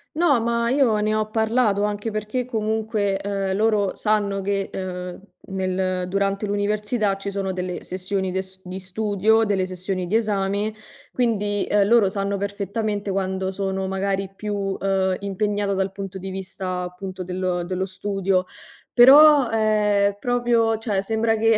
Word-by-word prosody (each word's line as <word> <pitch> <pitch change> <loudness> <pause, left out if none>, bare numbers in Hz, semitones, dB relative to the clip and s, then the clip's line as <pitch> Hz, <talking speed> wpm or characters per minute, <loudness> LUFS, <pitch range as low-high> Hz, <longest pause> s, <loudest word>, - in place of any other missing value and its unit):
No 315 -6 +3
ma 235 0 0
io 250 -5 +3
ne 215 +1 +1
ho 215 0 -1
parlato, 220 -2 +2
anche 210 +2 -3
perché, 215 +4 -2
comunque, 215 -3 -1
uhm, 195 -1 -1
loro 210 -2 +1
sanno 205 -2 0
che, 195 0 -1
uhm, 180 -1 -5 0.3
nel 185 -1 -1
durante 195 +2 0
l'università 210 +1 0
ci 195 0 -5
sono 195 -1 -2
delle 180 -1 -4
sessioni 190 0 -2
de 190 +1 -1
s 190 0 -11
di 185 +1 -6
studio, 210 +3 +1
delle 195 -3 +1
sessioni 185 0 -3
di 195 +5 -1
esame, 205 -1 0 0.4
quindi, 205 -4 0
ehm, 205 -1 +3
loro 225 -4 +5
sanno 200 0 -1
perfettamente 200 +1 -3
quando 190 0 -1
sono 190 0 -2
magari 195 0 -1
più, 210 +1 -4
uhm, 195 -1 0
impegnata 205 0 -1
dal 190 0 -1
punto 195 -1 -7
di 190 +1 -6
vista 185 -1 -4
appunto 185 +1 -6
del 180 -1 -2
dello 185 +1 -2
studio. 195 -1 -1 0.5
Però, 280 +1 +8
ehm, 210 -2 +2
proprio 235 -1 +2
cioè 215 -3 -1
sembra 225 +2 +1
che 225 0 +3
200 Hz, 150 wpm, -23 LUFS, 190-215 Hz, 0.5 s, Però